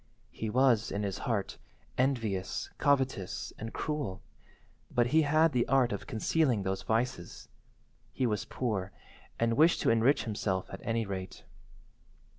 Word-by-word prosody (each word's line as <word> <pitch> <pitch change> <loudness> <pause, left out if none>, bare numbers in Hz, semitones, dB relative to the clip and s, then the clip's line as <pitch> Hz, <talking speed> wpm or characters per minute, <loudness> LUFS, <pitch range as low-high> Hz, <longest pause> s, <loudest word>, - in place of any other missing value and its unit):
He 110 - -4
was, 120 -2 +3
in 100 +1 -2
his 100 -1 -3
heart, 105 -4 -2 0.4
envious, 115 -8 -1
covetous, 130 -9 0
and 110 +1 -5
cruel, 150 -12 -3 0.7
but 120 - +2
he 160 - +6
had 155 +2 +4
the 125 -3 +1
art 135 -3 +3
of 100 - -4
concealing 120 -1 +1
those 95 0 -2
vices. 115 -5 -2 0.6
He 130 - -1
was 105 -4 -1
poor, 100 -7 -2 0.5
and 115 0 +2
wished 160 +6 +5
to - - +3
enrich 115 +5 +3
himself 105 -4 -2
at 95 - -7
any 115 -1 0
rate. 95 -2 -6
115 Hz, 140 wpm, -31 LUFS, 100-130 Hz, 0.7 s, he